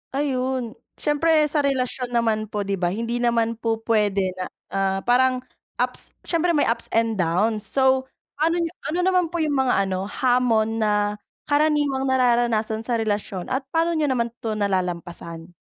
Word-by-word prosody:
Ayun, 260 Hz, -3 st, -1 dB, 0.2 s
siyempre 310 Hz, +1 st, +2 dB
sa 305 Hz, -, +1 dB
relasyon 255 Hz, -3 st, -1 dB
naman 220 Hz, -2 st, +1 dB
po, 210 Hz, -1 st, -3 dB
'di 195 Hz, -1 st, -2 dB
ba, 175 Hz, -, +1 dB
hindi 230 Hz, +6 st, -2 dB
naman 230 Hz, -1 st, +1 dB
po 225 Hz, -1 st, 0 dB
puwede 205 Hz, -4 st, +1 dB
na, 185 Hz, -, -2 dB, 0.3 s
ah, 195 Hz, 0 st, 0 dB
parang 255 Hz, +1 st, +3 dB, 0.3 s
ups, -, -, -1 dB
siyempre 340 Hz, 0 st, +1 dB
may 290 Hz, -, +3 dB
ups 230 Hz, 0 st, 0 dB
and 225 Hz, -2 st, +1 dB
downs. 205 Hz, +6 st, +1 dB
So, 265 Hz, -1 st, +2 dB, 0.3 s
paano 325 Hz, +2 st, +2 dB
niyo 330 Hz, -, -3 dB, 0.2 s
ano 335 Hz, +4 st, -1 dB
naman 365 Hz, -2 st, +3 dB
po 335 Hz, 0 st, -2 dB
yung 295 Hz, -2 st, 0 dB
mga 250 Hz, -6 st, +2 dB
ano 190 Hz, 0 st, -2 dB
hamon 225 Hz, -2 st, +1 dB
na 215 Hz, -1 st, +2 dB, 0.5 s
karaniwang 290 Hz, -2 st, +2 dB
nararanasan 235 Hz, -4 st, +1 dB
sa 245 Hz, -, +1 dB
relasyon 205 Hz, -4 st, -2 dB
at 265 Hz, +1 st, -2 dB
paano 330 Hz, +4 st, +1 dB
niyo 310 Hz, -2 st, +1 dB
naman 235 Hz, -3 st, 0 dB
'to 220 Hz, -2 st, -3 dB
nalalampasan? 175 Hz, -4 st, -3 dB
235 Hz, 160 wpm, -23 LUFS, 210-270 Hz, 0.5 s, parang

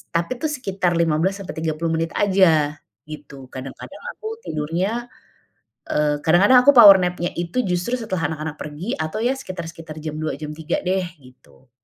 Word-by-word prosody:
Tapi 170 Hz, +9 st, 0 dB
tuh 315 Hz, -, +1 dB
sekitar 195 Hz, -10 st, -1 dB
15 170 Hz, +4 st, +1 dB
sampai 190 Hz, -, -6 dB
30 160 Hz, +1 st, -2 dB
menit 165 Hz, 0 st, -2 dB
aja, 165 Hz, -7 st, +3 dB, 0.3 s
gitu. 140 Hz, -3 st, -10 dB
Kadang-kadang 135 Hz, -, -9 dB
aku 435 Hz, -, -8 dB, 0.2 s
tidurnya, 180 Hz, +10 st, -2 dB, 0.8 s
eee, 150 Hz, -1 st, +1 dB
kadang-kadang 195 Hz, +10 st, +6 dB
aku 285 Hz, -, +9 dB
power 205 Hz, -6 st, +10 dB
nap-nya 180 Hz, -1 st, -1 dB
itu 175 Hz, +8 st, -1 dB
justru 180 Hz, +5 st, -1 dB
setelah 170 Hz, -8 st, -2 dB
anak-anak 155 Hz, 0 st, -5 dB
pergi, 150 Hz, +9 st, -5 dB
atau 155 Hz, +6 st, -3 dB
ya 245 Hz, +3 st, +2 dB
sekitar-sekitar 165 Hz, -6 st, -8 dB
jam 155 Hz, -1 st, -5 dB
2 155 Hz, -2 st, -2 dB
jam 150 Hz, -1 st, -6 dB
3 160 Hz, +1 st, -2 dB
deh, 185 Hz, 0 st, 0 dB, 0.2 s
gitu. 130 Hz, 0 st, -21 dB
170 Hz, 155 wpm, -22 LUFS, 155-195 Hz, 0.8 s, power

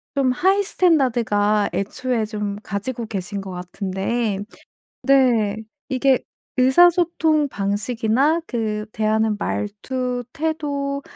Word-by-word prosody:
좀 270 Hz, -2 st, +2 dB
하이 385 Hz, +10 st, +2 dB
스탠다드가 235 Hz, -, +2 dB
애초에 235 Hz, +3 st, -1 dB
좀 210 Hz, -2 st, -4 dB
가지고 225 Hz, +5 st, -4 dB
계신 200 Hz, -1 st, -4 dB
것 195 Hz, -1 st, -7 dB
같은데 195 Hz, +4 st, -2 dB, 0.6 s
네. 240 Hz, -7 st, +3 dB, 0.3 s
이게 265 Hz, 0 st, +3 dB, 0.4 s
의사소통 320 Hz, +2 st, +4 dB
방식이나 225 Hz, +8 st, +1 dB
그 215 Hz, -3 st, -2 dB
대하는 220 Hz, 0 st, +1 dB
말투, 245 Hz, +5 st, -3 dB
태도, 285 Hz, -3 st, -2 dB
240 Hz, 215 characters per minute, -21 LUFS, 210-275 Hz, 0.6 s, 의사소통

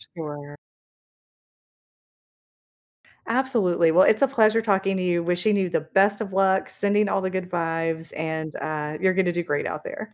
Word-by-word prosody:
Sure. 145 Hz, -2 st, -8 dB, 2.7 s
Absolutely, 225 Hz, -10 st, +1 dB
well, 180 Hz, +3 st, +5 dB
it's 215 Hz, -, +3 dB
a 275 Hz, -, +5 dB
pleasure 225 Hz, -4 st, +2 dB
talking 195 Hz, -3 st, 0 dB
to 185 Hz, -, -2 dB
you, 175 Hz, -1 st, 0 dB
wishing 180 Hz, +4 st, 0 dB
you 190 Hz, -2 st, 0 dB
the -, -, 0 dB
best 195 Hz, +6 st, +1 dB
of 200 Hz, -4 st, -6 dB
luck, 190 Hz, 0 st, +1 dB
sending 205 Hz, +1 st, +4 dB
all 195 Hz, -, -1 dB
the 185 Hz, -, -2 dB
good 185 Hz, -1 st, -5 dB
vibes, 165 Hz, -2 st, -3 dB
and, 160 Hz, -1 st, -4 dB
uh, 155 Hz, 0 st, -4 dB
you're 185 Hz, 0 st, +2 dB
gonna 185 Hz, -2 st, +1 dB
do 175 Hz, 0 st, -3 dB
great 145 Hz, -2 st, -2 dB
out 155 Hz, -, -5 dB
there. 215 Hz, 0 st, -8 dB
185 Hz, 165 wpm, -23 LUFS, 165-200 Hz, 2.7 s, well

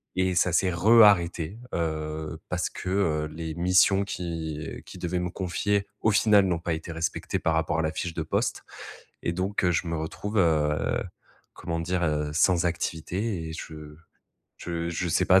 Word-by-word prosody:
et 95 Hz, 0 st, +1 dB
ça 90 Hz, 0 st, +3 dB
s'est 90 Hz, 0 st, +3 dB
re-arrêté, 95 Hz, -2 st, +4 dB, 0.2 s
heu, 80 Hz, -1 st, -3 dB
parce 90 Hz, 0 st, -1 dB
que, 90 Hz, -, -6 dB
heu, 80 Hz, -6 st, +1 dB
les 80 Hz, -1 st, -5 dB
missions 90 Hz, +3 st, +4 dB
qu'ils 80 Hz, -4 st, -5 dB
qu'ils 90 Hz, -, -11 dB
devaient 90 Hz, 0 st, -1 dB
me 90 Hz, 0 st, -2 dB
confier 100 Hz, +3 st, -1 dB
au 110 Hz, -, +3 dB
final 100 Hz, -1 st, +5 dB
n'ont 85 Hz, -3 st, 0 dB
pas 85 Hz, -1 st, -2 dB
été 80 Hz, +2 st, -5 dB
respectées 80 Hz, 0 st, -2 dB
par 80 Hz, -, +1 dB
rapport 80 Hz, 0 st, 0 dB
à -, -, +3 dB
la 80 Hz, -, 0 dB
fiche 85 Hz, +2 st, -4 dB
de 80 Hz, -, -1 dB
poste -, -, -1 dB, 0.6 s
et 85 Hz, -, -1 dB
donc, 95 Hz, +2 st, -1 dB
heu, 90 Hz, -, +4 dB
je 85 Hz, -, 0 dB
me 85 Hz, -, -1 dB
retrouve, 105 Hz, +7 st, -3 dB
heu, 75 Hz, -4 st, +2 dB, 0.5 s
comment 85 Hz, -1 st, -3 dB
dire? 90 Hz, +1 st, -1 dB
Heu, 75 Hz, -2 st, 0 dB
sans 90 Hz, +1 st, +3 dB
activité 85 Hz, +2 st, -2 dB
et -, -, -6 dB
je 75 Hz, -2 st, -9 dB, 0.6 s
je 85 Hz, -1 st, -3 dB
je 85 Hz, +1 st, -2 dB
sais 90 Hz, +3 st, +2 dB
pas 95 Hz, 0 st, +7 dB
85 Hz, 180 wpm, -27 LUFS, 80-95 Hz, 0.6 s, pas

